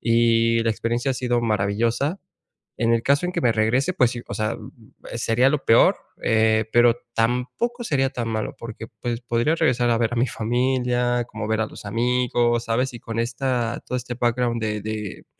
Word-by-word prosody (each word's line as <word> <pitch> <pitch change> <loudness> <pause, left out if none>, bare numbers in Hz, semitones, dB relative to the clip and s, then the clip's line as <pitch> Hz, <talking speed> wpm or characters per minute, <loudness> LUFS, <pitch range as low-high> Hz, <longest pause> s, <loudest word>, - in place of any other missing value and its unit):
y 115 0 +3
la 115 - +1
experiencia 120 +4 -1
ha - - 0
sido 120 -1 0
maravillosa. 115 - 0 0.6
En 115 0 +3
el 115 - 0
caso 140 +6 +2
en 180 - -3
que - - -1
me 120 - +4
regrese, 120 +9 +1
pues 125 -8 +3
sí, 120 - -6
o - - -6
sea, 110 0 -1
uh, - - -12
uh, 130 - -12 0.4
sería 120 +3 +2
lo 150 -1 -1
peor, 115 - +5 0.3
eh, 110 0 +3
pero 120 0 +5 0.2
tampoco 125 - -1
sería 135 -9 +1
tan 120 -3 -4
malo, 110 -1 -3
porque 115 -1 -8
pues 120 -1 -3
podría 120 +5 +1
regresar 120 -4 +2
a 115 - +2
ver 115 0 0
a - - -5
mi 120 +2 +2
familia, 120 +1 0
como 110 -2 -6
ver 110 0 +1
a 110 - +1
los - - -12
amigos, 120 +1 +1
¿sabes? 125 +3 0
Y 120 - -8
con 115 0 -5
esta 120 0 -2
todo 125 - -2
este 125 0 -6
background 120 -1 0
de 105 -1 -2
de 105 -2 -5
120 Hz, 200 wpm, -23 LUFS, 115-125 Hz, 0.6 s, peor